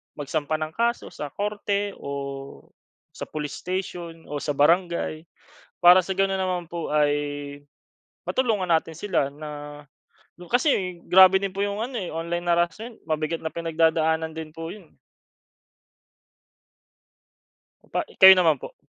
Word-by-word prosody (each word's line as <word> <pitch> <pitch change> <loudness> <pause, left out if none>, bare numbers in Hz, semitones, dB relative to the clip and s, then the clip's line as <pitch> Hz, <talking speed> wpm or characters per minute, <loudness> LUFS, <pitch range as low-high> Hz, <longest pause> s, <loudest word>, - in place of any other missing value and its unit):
magsampa 150 +1 -2
ng 155 0 -3
kaso 235 +6 -1
sa 150 - -6
korte 205 +3 -2
o - - -9 1.0
sa - - -8
police 150 -2 -5
station, 175 -3 -5
o 145 - -2
sa 150 - -1
barangay. 170 +1 +1 0.6
Para 175 +1 +9
sa 190 - -2
ganoon 195 0 +1
naman 185 -2 -1
po 170 -1 -4
ay, 150 -1 +3 1.2
matulungan 220 -8 0
natin 165 -1 +1
sila 170 -6 -1
na 145 0 -9 0.7
kasi 190 - 0
grabe 190 0 +7
din 195 0 -3
po 195 - -8
yung 205 +2 -3
ano 245 0 -4
eh, 185 - -4
online 170 +2 -4
harassment. 175 +7 0
Mabigat 155 +1 -2
na 160 - -3
pinagdadaanan 160 -1 +1
din 160 0 -8
po 165 0 -6
iyon. 210 - -14 3.0
Pa - - +1
i - - -20
kayo 190 0 +11
naman 165 -6 +3
po. - - -8
170 Hz, 135 wpm, -24 LUFS, 155-190 Hz, 3.0 s, kayo